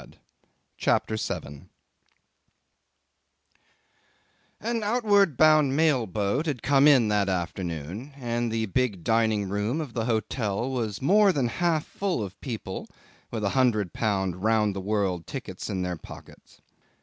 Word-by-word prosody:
CHAPTER 110 - +1
7 70 -9 -5 2.9
'An 230 +1 -2
outward 205 - +3
bound 155 -3 +5
mail 145 -7 +2
boat 105 - -1
had 135 -6 -3
come 140 +1 +5
in 130 -7 +6
that 105 -2 +1
afternoon, 90 - -4
and 120 -2 -2
the 110 0 0
big 105 -4 -1
dining 110 -2 +1
room 105 +9 -1
of 145 -7 -5
the 115 -2 -2
hotel 110 +1 -1
was 115 -4 -3
more 200 +6 +5
than 135 -8 0
half 165 +3 0
full 190 - -2
of 95 -1 -9
people 110 -7 -5 0.4
with 110 -2 -4
a 100 - +2
hundred 110 -6 +1
pounds 95 -5 0
round 105 0 +1
the 95 - -3
world 95 -4 -1
tickets - - -6
in 95 -1 -2
their 90 -1 -3
pockets. - - -14
115 Hz, 135 wpm, -26 LUFS, 100-140 Hz, 2.9 s, in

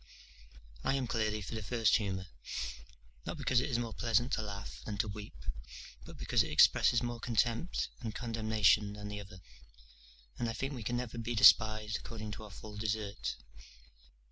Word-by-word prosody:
D.W.] - - -21 0.2
I 135 - +2
am 135 -2 0
clearly 110 -3 -1
for 95 - -7
the 110 - -3
first 115 +1 +3
humour; 95 -4 -3 1.0
not - - -3
because 125 -2 +2
it 135 - -2
is 120 - +1
more 115 -2 -3
pleasant 120 +3 +1
to - - +1
laugh 100 -1 -6
than 105 -2 -4
to 105 - +1
weep, 100 - -8 0.6
but - - -11
because - - +2
it - - -1
expresses 120 0 +5
more 120 -1 -3
contempt 120 - 0
and 110 -3 -5
condemnation 110 -3 +2
than 105 0 -7
the 105 0 -5
other, 95 -2 -11 1.0
and 120 -1 0
I - - -2
think 135 +4 -3
we 125 - -6
can 120 +3 -1
never 120 -1 -4
be 115 +1 -2
despised 110 0 +6
according 110 -2 -7
to 105 - -7
our - - -11
full 105 +1 -10
desert. 105 -1 -2
110 Hz, 180 wpm, -33 LUFS, 105-120 Hz, 1.0 s, despised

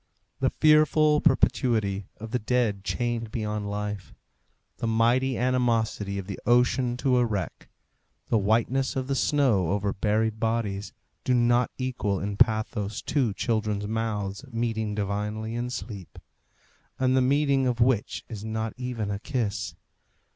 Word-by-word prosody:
The - - +2
fearful 155 0 +4
perpetuity 110 - +2
of 110 0 -8
the 125 - 0
dead 110 -4 0
chained 115 +4 -2
beyond 105 -3 -3
life, 105 -1 -5 0.6
the 115 - -2
mighty 120 +3 +2
animosity 115 -5 0
of 100 - -4
the 100 0 -6
ocean 125 +1 +3
to 130 0 +2
a 125 - +4
wreck, 100 -6 -4 0.6
the 115 - +3
whiteness 115 +6 +1
of 130 -1 -1
the 135 - -1
snow 130 - +2
over 100 0 0
buried 110 +2 0
bodies, 110 -3 -1 0.3
do 130 - +2
not 120 0 +3
equal 125 -7 -1
in 100 +1 -3
pathos 110 -1 +1
two 130 -7 +1
children's 105 -3 -1
mouths 105 -1 -2
meeting 110 -2 -1
divinely 105 +2 -2
in 120 +1 -2
sleep, 100 -5 -7 0.8
and 130 0 +2
the 130 - +4
meeting 140 0 +2
of 125 -1 -1
which 120 -3 +1
is 105 -3 -7
not 110 0 -3
even 125 -5 -3
a 100 - -3
kiss. 105 -4 -2
115 Hz, 140 wpm, -26 LUFS, 105-125 Hz, 0.8 s, fearful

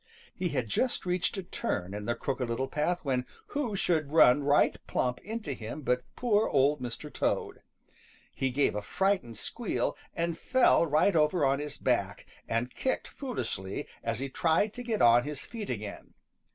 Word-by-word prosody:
He 180 - -2
had 125 -7 -1
just 240 - 0
reached 180 +2 0
a 195 - -3
turn 95 - -3
in 105 0 -5
the 120 +1 0
Crooked 130 -3 -2
Little 125 +3 -1
Path 155 +5 -1
when 130 -2 +1 0.3
who 270 -8 -2
should 160 -6 +1
run 145 -4 +6
right 145 +1 +4
plump 125 0 0
into 215 -7 -4
him 120 +5 -7
but 125 -1 +1
poor 220 -3 +2
Old 140 0 +3
Mr. 125 +5 -6
Toad. - - -1 0.7
He 135 - 0
gave 140 +3 +2
a 105 - -2
frightened 185 - 0
squeal - - -1 0.2
and 170 0 -1
fell 255 -9 +4
right 155 +6 +3
over 150 0 +3
on 135 +1 +2
his 150 -1 -5
back, - - 0 0.2
and 115 +2 -1
kicked 260 - -1
foolishly 120 - -4 0.2
as 115 -1 -1
he 135 +3 -2
tried 170 +7 +1
to 245 - -6
get 230 -3 0
on 120 +1 +7
his 145 -1 -5
feet 225 -3 -7
again. 105 -3 -6
145 Hz, 175 wpm, -30 LUFS, 125-185 Hz, 0.7 s, on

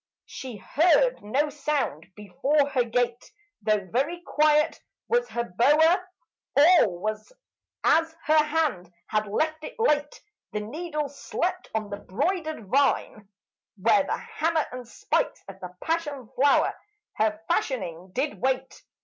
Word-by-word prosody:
She 255 -5 -8
heard 360 - +3
no 275 +8 0
sound 285 - -2
before 270 +9 +1
her 260 -3 +2
gate, 240 +1 -1 0.4
Though 210 -2 +1
very 285 - -1
quiet 305 -1 +2 0.3
was 480 +1 +1
her 235 - -2
bower. 310 - +3 0.5
All 290 - +6
was 215 - -4 0.5
as 325 0 +3
her 310 0 +4
hand 300 - -1
had 215 0 -1
left 315 +9 -1
it - - -7
late: 295 -9 +1 0.3
The 210 - -2
needle 300 +6 -4
slept 275 0 -3
on 215 -2 -2
the 200 - -3
broidered 310 - -2
vine, 240 -5 +1 0.5
Where 230 +8 +4
the - - -2
hammer 335 -9 -1
and 250 -1 -8
spikes - - -1
of 195 -1 -10
the 180 - -7
passion 295 -7 -2
flower 280 +1 +4 0.4
Her 215 -1 +1
fashioning 185 - -2
did 280 +5 -2
wait. 260 0 -1
275 Hz, 130 wpm, -26 LUFS, 215-315 Hz, 0.5 s, All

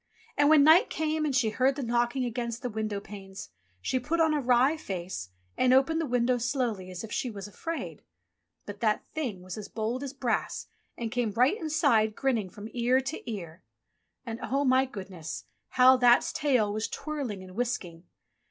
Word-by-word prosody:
And 290 0 +4
when 310 -2 +7
night 325 +9 +6
came 315 0 -1
and 285 -3 0
she 235 -4 +2
heard 260 +4 +2
that 275 -3 -3
knocking 240 +2 +1
against 235 0 -4
the 250 - -2
window 215 -1 -2
panes, 195 - -10 0.3
she 255 - 0
put 305 +7 -1
on 320 -1 +4
a 295 - +1
wry 255 +4 +4
face, 180 - -5 0.3
and 255 0 +4
opened 320 +5 +3
the 320 - -2
window 245 0 +1
slowly 235 -6 -1
as 180 +1 -7
if 220 - -8
she 250 - -1
was 205 -3 -7
afraid. 330 +10 -6 0.6
But 205 0 -8
That 215 -2 +1
thing 240 - -4
was 185 +3 -7
as 205 - -7
bold 230 +4 -3
as 280 -1 -5
brass 250 -5 -2 0.3
and 230 -2 -4
came 245 -2 0
right 250 - +3
inside, 265 - +2
grinning 235 -8 0
from 205 +3 -9
ear 245 +2 +3
to 265 -3 -5
ear. 170 -4 -7 0.6
And 230 -1 -5
oh, 275 +2 0
my 260 0 +4
goodness! 185 -8 -7 0.2
how 255 +1 +6
That's 245 -1 +4
tail 250 -8 +2
was 215 +1 -1
twirling 270 -11 -5
and 185 0 -12
whisking 190 -8 -3
240 Hz, 185 wpm, -28 LUFS, 210-270 Hz, 0.6 s, when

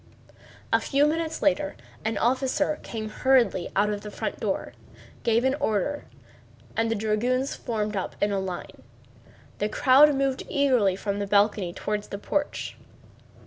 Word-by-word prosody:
A - - +6
few 280 +1 +2
minutes 320 +1 -1
later 295 0 +1 0.3
an 220 -1 -1
officer 265 +5 +1
came 220 -2 -5
hurriedly 250 -6 +2
out 210 +2 +3
of 205 -1 -3
the 210 - -7
front - - -4
door, - - -2 0.5
gave 230 +1 +2
an 265 0 +3
order, 220 +8 -1 0.7
and 225 0 +1
the 225 - +1
dragoons 235 +5 0
formed 215 -2 -3
up 190 - -3
in 205 - +1
line. 185 -2 -6 0.8
The 210 - 0
crowd 280 +6 +6
moved 270 -1 0
eagerly 255 -10 +3
from 200 +1 -3
the 200 - -2
balcony 200 -2 +2
toward 210 +4 -2
the 200 - -6
porch. 290 +8 -3
225 Hz, 145 wpm, -26 LUFS, 205-275 Hz, 0.8 s, A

